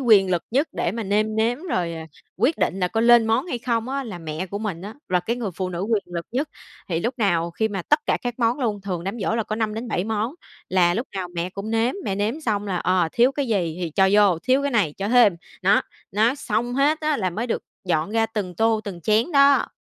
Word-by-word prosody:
quyền 210 -7 +5
lực 175 -2 +1
nhất 275 +7 +1
để 175 - -1
mà 230 +1 -3
nêm 215 +2 0
nếm 230 +3 +1
rồi, 180 - -1
ờ, 165 - -6 0.4
quyết 250 - +1
định 190 0 0
là 180 - +1
có 225 - -1
lên 235 -1 +6
món 225 +7 +1
hay 250 -9 -3
không 235 -1 -1
á 275 +1 -2
là 210 -7 -7
mẹ 160 +2 -5
của 200 +2 -5
mình 200 -6 -4
á, 210 +3 -7
là 180 -1 +2
cái 235 +6 -2
người 230 -5 -3
phụ 185 -1 -2
nữ 175 -1 -4
quyền 215 0 +1
lực 170 -1 -5
nhất. 280 +5 -1 0.4
Thì 165 -2 -1
lúc 235 +8 -1
nào 170 -5 +1
khi 220 +6 -1
mà 195 -3 -4
tất 295 - +3
cả - - +2
các 245 0 -4
món 235 +2 +1
luôn, 220 -6 -1
thường 185 -3 -4
đám 195 +5 -4
giỗ 205 - 0
là 230 - +1
có 215 0 -4
5-7 220 -3 -2
món 220 +4 -2 0.3
là 175 -2 +3
lúc 235 +7 -2
nào 185 -2 -3
mẹ 170 +1 -2
cũng 200 +3 -6
nếm, 225 +2 +1
mẹ 195 - -1
nếm 215 +9 -1
xong 210 -7 -1
là, 190 -2 -1
ờ, 180 -1 +1
thiếu 245 +3 +4
cái 280 0 -2
gì 175 -7 0
thì 170 - -2
cho 190 +5 +3
vô, 205 -5 +5
thiếu 260 +3 +2
cái 285 - 0
này 210 - +2
cho 195 +1 -3
thêm, 230 -6 +5 0.3
nó, 195 +2 +4 0.3
nó 220 +5 +3
xong 240 -2 -2
hết 295 +3 +2
á 305 -1 +1
là 185 -6 -1
mới 220 +7 -3
được 235 - -2 0.2
dọn 165 0 0
ra 225 0 +2
từng 205 -5 -4
tô, 225 +3 +2
từng 190 -5 -6
chén 220 - +1
đó. 280 -1 +5
215 Hz, 255 wpm, -23 LUFS, 185-240 Hz, 0.4 s, lên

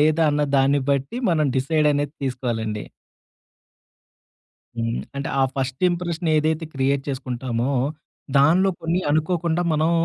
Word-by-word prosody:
లేదా, 155 +2 +3
అన్న 145 0 +1
దాన్ని 135 +1 +3
బట్టి 140 - -1
మనం 155 -3 +2
డిసైడ్ 150 +3 +2
అనేది 145 0 -1
తీసుకోలండి. 115 -5 -2 1.9
హ్మ్. 115 0 -1 0.2
అంటే, 140 - -3
ఆ - - +5
ఫస్ట్ 130 +1 -3
ఇంప్రెషన్ 175 -1 -2
ఏదైతే 155 +1 +1
క్రియేట్ 135 +1 +1
చేసుకుంటామో, 125 -2 -2 0.7
దానిలో 175 +7 +4
కొన్ని 165 +2 0
అనుకోకుండా 165 +2 +1
మనం 155 +1 +2
145 Hz, 120 wpm, -23 LUFS, 130-160 Hz, 1.9 s, ఆ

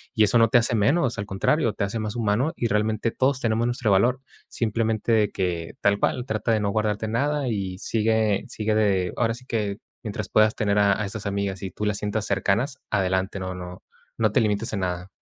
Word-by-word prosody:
y 110 - +5
eso 105 +3 +4
no 115 - +6
te 125 - +5
hace 120 +1 +2
menos. 120 +4 +2
Al 100 - -4
contrario, 110 +5 +1
te - - -2
hace 100 +3 -2
más 110 +1 -4
humano 115 +6 +1
y 120 - -1
realmente 110 +1 0
todos 130 0 +1
tenemos 115 -1 +1
nuestro 120 -3 0
valor. 120 +7 +3 0.3
Simplemente 110 0 -1
de 105 -2 +3
que, 85 -3 -3
tal 100 0 +3
cual, 125 - 0
trata 110 -1 -1
de 110 - +3
no 100 -1 0
guardarte 110 0 -1
nada 140 +5 0
y 95 -4 -3
sigue 110 -1 +1
sigue 110 0 -2
de 95 -4 +1
ahora 115 -1 +1
sí 125 - -13
que, 105 -5 -2 0.3
mientras 105 -1 -4
puedas 110 0 +4
tener 105 -1 +1
a 100 0 +3
a 105 - -1
esas 105 +1 -6
amigas 100 -1 -2
y 95 - -4
tú 105 - -4
las 105 -1 0
sientas 105 0 -2
cercanas, 105 +7 0
adelante. 95 0 0
No 95 0 -4
no 90 0 -9 0.3
no 110 -2 +2
te 125 - +3
limites 105 +1 -1
en 100 - -1
nada. 90 -1 -3
105 Hz, 215 wpm, -24 LUFS, 100-115 Hz, 0.3 s, no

